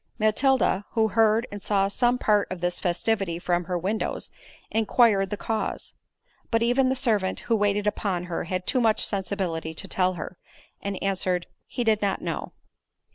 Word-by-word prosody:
Matilda, 215 -1 +2
who 220 -1 +2
heard 225 +1 +3
and 205 0 -7
saw 195 -1 +2
some 240 +5 +2
part 210 -4 +2
of 185 - -4
this 175 0 -1
festivity 185 0 0
from 175 0 0
her 180 +1 -1
windows, 195 +6 -2 0.4
inquired 220 -3 +3
the 210 - -3
cause; 220 +1 -3 0.6
but 230 0 +2
even 255 +2 +3
the 260 - +1
servant 215 -7 0
who 230 - +1
waited 205 -1 +1
upon 195 -4 -1
her 175 -2 -3
had 185 +1 -3
too 255 - +2
much 220 -2 +3
sensibility 185 -5 -2
to - - -5
tell 185 0 +1
her, 180 0 -7 0.4
and 200 -1 -3
answered, 185 -2 0 0.2
"He 245 - -2
did 220 -2 +2
not 200 -1 0
know." - - -4
205 Hz, 170 wpm, -26 LUFS, 185-225 Hz, 0.6 s, heard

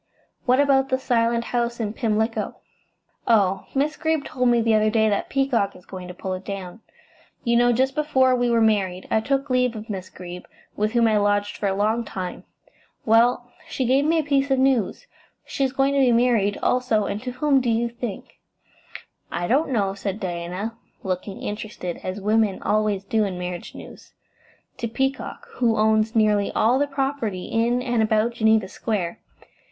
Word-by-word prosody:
What 255 +2 +4
about 270 -1 +3
the 260 - +2
Silent 235 -2 +1
House 235 0 -2
in 215 -2 -2
Pimlico?" 220 0 -1 0.7
"Oh, 195 -4 +2
Miss 295 +3 0
Greeb 315 -3 0
told 250 -1 0
me 240 -1 +4
the 225 -1 +2
other 215 0 +3
day 220 0 +2
that 200 - -1
Peacock 260 -7 0
is 180 - -16
going 185 -1 -8
to 180 - -8
pull 185 +1 -4
it 185 +1 -6
down. 195 +1 -7 0.6
You 235 -1 +2
know, 240 +1 +4
just 260 +3 +1
before 265 -4 +2
we 245 -1 +1
were 230 -1 +3
married 195 -4 +1
I - - +3
took 275 +4 -1
leave 250 -2 +2
of 215 +1 -7
Miss 185 -2 -6
Greeb, 180 -1 -9 0.3
with 215 +2 -1
whom 235 -1 +4
I 215 -1 +3
lodged 205 0 +1
for 205 - -2
a 195 - 0
long 215 +4 +1
time. 185 -4 -6 0.6
Well, 240 +2 +3 0.2
she 260 - -2
gave 265 +3 +3
me 325 +2 +3
a 320 - +2
piece 280 -1 +1
of 270 - +3
news. 265 - +1 0.4
She 275 - -2
is 265 - +1
going 270 +1 +1
to 280 - +2
be 260 -2 +4
married, 230 -4 +2
also, 250 -4 +2
and 205 +1 -3
to 250 0 -5
whom, 275 +1 +2
do 245 - -1
you 230 +1 +1
think?" 235 -3 -7 0.9
"I 175 - -2
don't 280 - +2
know," 200 -6 0
said 200 0 -4
Diana, 180 +4 -4 0.3
looking 190 +1 -4
interested, 210 -4 -5
as 185 +2 -4
women 210 0 +1
always 210 -2 +1
do 215 +2 +1
in 190 -3 -3
marriage 180 -1 -6
news. - - -12 0.6
"To 235 - -3
Peacock, 270 - -3
who 230 -3 +2
owns 220 +1 +2
nearly 210 -2 +3
all 245 +4 +3
the 285 - +1
property 270 -9 -2
in 240 +2 0
and 240 -3 +1
about 220 +1 +2
Geneva 220 -3 +2
Square. 195 -2 -3
225 Hz, 185 wpm, -23 LUFS, 205-250 Hz, 0.9 s, What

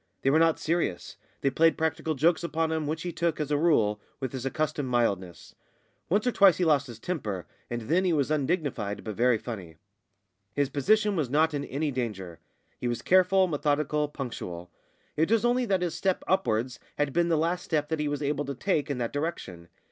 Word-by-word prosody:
They 135 - +3
were 155 - +4
not 165 -1 +4
serious; 155 - -2 0.3
they 140 - +2
played 165 +4 +3
practical 160 0 -1
jokes 160 +5 +2
upon 165 -1 -1
him, 160 -2 -1
which 155 +2 -3
he 175 - -3
took, 170 -2 -1
as 150 -1 -2
a - - +3
rule, 110 -11 +2 0.2
with 130 -3 -3
his 130 0 -4
accustomed 150 -1 -2
mildness; 100 -8 -1 0.6
once 205 +5 +2
or 250 - +2
twice 195 -5 +6
he 180 - +1
lost 145 -3 +3
his 120 -3 -9
temper, 110 - -4 0.2
and 120 -1 -4
then 170 +11 +2
he 185 - +2
was 150 -2 +1
undignified 145 - -1
but 110 - -4
very 120 +2 +3
funny. 105 -8 -7 0.8
His 145 -2 +1
position 210 +9 +2
was 150 -8 -1
not 155 +3 +2
in 145 -1 -2
any 145 +3 -2
danger. 100 -9 -4 0.4
He 125 - -2
was 120 -1 -2
careful, 185 +1 +4
methodical, 150 -2 0
punctual. 90 -11 -6 0.4
It 160 +3 +1
was 230 0 +3
only 245 +1 +2
that 190 -3 +1
his 175 - -1
step 190 -2 -1
upwards 125 - 0 0.2
had 145 -2 0
been 170 0 +2
the 165 - +3
last 170 +3 0
step 150 -2 0
that 160 -1 -1
he 150 - 0
was 145 0 -2
able 145 0 -1
to 140 0 -4
take 150 0 0
in 140 - -1
that 120 -2 -3
direction. 145 - -4
150 Hz, 205 wpm, -28 LUFS, 120-165 Hz, 0.8 s, twice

